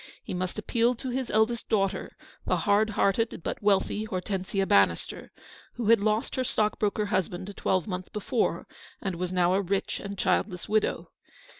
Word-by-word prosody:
He - - -6
must 185 +2 -3
appeal 235 +3 +1
to 250 +2 -5
his 260 0 -2
eldest 220 +2 +1
daughter, 195 -3 0 0.3
the - - +3
hard 210 +1 +3
hearted 210 0 +1
but - - -3
wealthy 205 +1 +2
Hortensia 195 -1 -2
Bannister, 100 - +2 0.4
who 235 -3 -1
had 230 -1 +7
lost 215 +2 0
her 260 - +1
stockbroker 210 -2 0
husband 190 -1 -2
a - - -7
twelvemonth 185 -1 -1
be 210 - -3
fore, 230 +3 0 0.3
and 190 -3 -3
was 180 0 -2
now 180 -1 +3
a 195 - +3
rich 195 +1 -1
and 200 0 -6
childless 185 -1 0
widow. 215 0 0
200 Hz, 165 wpm, -28 LUFS, 185-220 Hz, 0.4 s, had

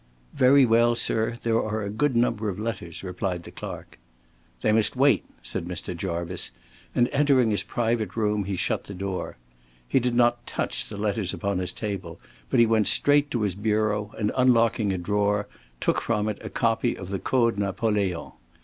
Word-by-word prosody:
"Very 135 +1 +6
well, 115 0 +4
sir. 115 0 +1
There 115 -1 +2
are 110 0 -2
a 100 - -4
good 130 +5 0
number 115 -3 +1
of 95 - -4
letters," 105 -7 -5
replied 90 -1 -3
the - - -11
clerk. - - -8 0.6
"They 110 - +2
must 110 +2 +3
wait," 140 +2 +4 0.2
said - - -3
Mr. 90 0 -3
Jarvice, 85 -1 -2 0.5
and 120 - +4
entering 135 -5 +3
his 105 - +1
private 115 -2 -1
room 105 -2 0
he 100 0 -2
shut - - -1
the 100 - -8
door. 95 0 -4 0.5
He 135 - +3
did 125 -1 -1
not 120 0 +2
touch - - -2
the 105 - -6
letters 100 -2 -1
upon 100 -2 -1
his 90 -1 -1
table, 100 -3 -5 0.3
but - - +2
he 120 - +7
went 110 -3 +2
straight 145 0 +4
to 120 -5 -1
his 100 -3 0
bureau, 105 0 0
and 105 -1 0
unlocking 115 -4 +3
a 95 - -1
drawer, 105 +3 0 0.3
took - - +1
from 110 -2 0
it 105 - -3
a - - -6
copy 115 +1 0
of 95 - -8
the 95 -1 -2
Code 115 -5 +1
Napoleon. 100 -3 -1
110 Hz, 185 wpm, -25 LUFS, 100-115 Hz, 0.6 s, he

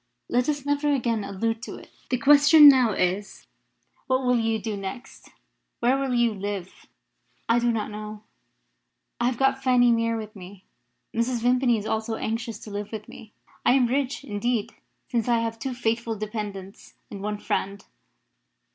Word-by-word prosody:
Let 245 +3 +1
us 285 -2 -2
never 290 +1 +1
again 235 -6 0
allude 225 +3 -2
to 260 - -7
it. - - -14 0.2
The 255 - +1
question 290 +4 +7
now 255 -6 +6
is 190 +3 -2 0.6
what 260 0 +1
will 250 -1 +3
you 225 0 0
do 215 0 -4
next? 195 +5 -8 0.5
Where 245 +2 +3
will 270 -2 -1
you 240 -2 +2
live?" 200 -2 -6 0.6
"I 230 +1 +3
do 240 0 +2
not 215 -2 -3
know. 210 0 -8 1.0
I 240 - +2
have 250 -2 -1
got 270 0 +2
Fanny 250 -2 +4
Mere 230 0 +1
with 215 -1 -8
me. 190 0 -12 0.5
Mrs. 235 0 -1
Vimpany 245 -1 +3
is 210 - -5
also 220 +1 -2
anxious 225 0 -3
to 215 - -10
live 205 0 -5
with 215 -2 -7
me. 215 - -13 0.3
I - - +4
am 260 -2 +4
rich, 270 +2 -1
indeed, 225 +1 -2 0.3
since 235 -2 -1
I 240 -1 +3
have 225 0 -3
two 260 +1 -4
faithful 230 -1 -1
dependants 205 -2 -7 0.2
and 200 -2 -7
one 210 +1 -3
friend." 200 -1 -3
230 Hz, 170 wpm, -25 LUFS, 210-250 Hz, 1.0 s, question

